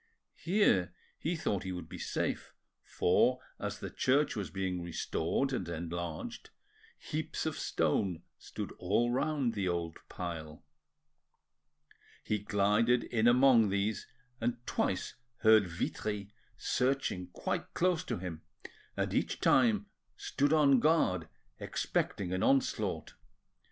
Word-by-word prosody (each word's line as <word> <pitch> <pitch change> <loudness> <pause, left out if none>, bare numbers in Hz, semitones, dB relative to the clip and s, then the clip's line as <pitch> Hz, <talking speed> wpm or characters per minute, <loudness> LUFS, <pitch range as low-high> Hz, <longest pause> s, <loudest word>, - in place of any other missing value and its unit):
Here 130 - +2 0.2
he 170 +3 -1
thought 100 - -1
he 95 - -4
would 90 -3 -6
be 90 +1 -9
safe, - - -2 0.3
for, 125 +8 +2 0.2
as - - -3
the - - -6
church 140 +4 +2
was 105 -3 -3
being 95 -2 -2
restored 85 +8 -1
and 95 -9 -2
enlarged, 85 -1 -5 0.5
heaps - - -4
of - - -1
stone 90 -4 0 0.2
stood - - -6
all 115 +7 +2
round 135 -2 0
the 100 -4 -1
old 85 -2 -2
pile. 80 -3 -6 1.6
He 105 - 0
glided 105 +4 +2
in 115 -1 +1
among 120 -3 +6
these, 100 +2 -1 0.3
and 120 +1 0
twice - - -1 0.3
heard 110 -3 +6
Vitry 100 +4 -3 0.2
searching 125 -8 0
quite 90 - -3
close 180 -2 +2
to - - -2
him, 85 -3 -6 0.6
and - - -1
each - - 0
time 215 -3 +4 0.3
stood 145 +1 0
on 145 -4 +5
guard 95 - +2 0.3
expecting 90 -2 -1
an 95 - -1
onslaught. 135 0 +1
105 Hz, 120 wpm, -32 LUFS, 90-130 Hz, 1.6 s, among